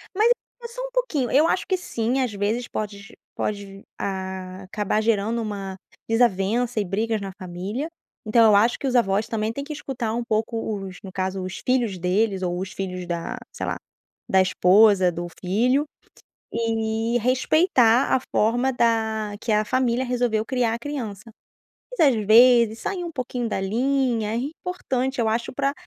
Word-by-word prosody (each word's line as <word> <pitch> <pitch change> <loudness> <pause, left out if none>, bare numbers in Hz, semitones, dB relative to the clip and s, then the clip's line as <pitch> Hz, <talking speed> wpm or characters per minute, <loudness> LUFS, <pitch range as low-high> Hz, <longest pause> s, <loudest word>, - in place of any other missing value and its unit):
mas 435 +4 +4 0.4
só 485 +2 -8
um - - -5
pouquinho. 345 - -1
Eu 300 +5 +5
acho - - 0
que 380 - +2
sim, 260 -7 -1
às 250 -4 -1
vezes 210 +4 -1
pode 200 -2 -6 0.2
pode 200 -1 -4 0.2
a 190 -1 -5
acabar 210 +2 -1
gerando 225 +1 +1
uma 200 -3 -5 0.3
desavença 225 +1 +1
e 205 - 0
brigas 215 +4 -1
na 195 -1 -6
família, 190 - -4 0.4
então 230 +1 +5
eu - - +5
acho 225 +4 +4
que - - -6
os 255 - 0
avós 210 -2 +2
também 220 -1 -1
têm 280 +4 -5
que 300 +2 -6
escutar 245 -6 -4
um 240 +1 -1
pouco 220 -2 -2
os, 185 -1 -9
no 190 - -8
caso, 190 0 -2
os 185 0 -5
filhos 240 -6 +1
deles 190 +2 0
ou 175 0 -1
os 190 +1 -5
filhos 180 -1 -5
da, 170 -1 -3
sei - - -5
lá, - - -2 0.5
da 190 - +4
esposa 185 +1 +5
do 175 +1 -5 0.2
filho, 245 +10 +2 0.7
e 225 0 0
respeitar 255 - +3
a - - +2
forma 240 +5 +2
da 220 -3 0
que 230 - -2
a 215 0 +2
família 255 +2 +1
resolveu 240 -3 0
criar 245 -2 0
a - - -7
criança. 235 -8 -5 0.8
Mas, 310 - +6
às 265 - +3
vezes, 235 0 +6
sair 360 +6 -3
um 340 - -4
pouquinho 250 -3 -3
da 205 - -2
linha 230 +1 0
é - - -1
importante, 265 -2 -3
eu 225 - +2
acho 230 +3 -1
pra 275 +1 0
225 Hz, 170 wpm, -24 LUFS, 200-250 Hz, 0.8 s, Mas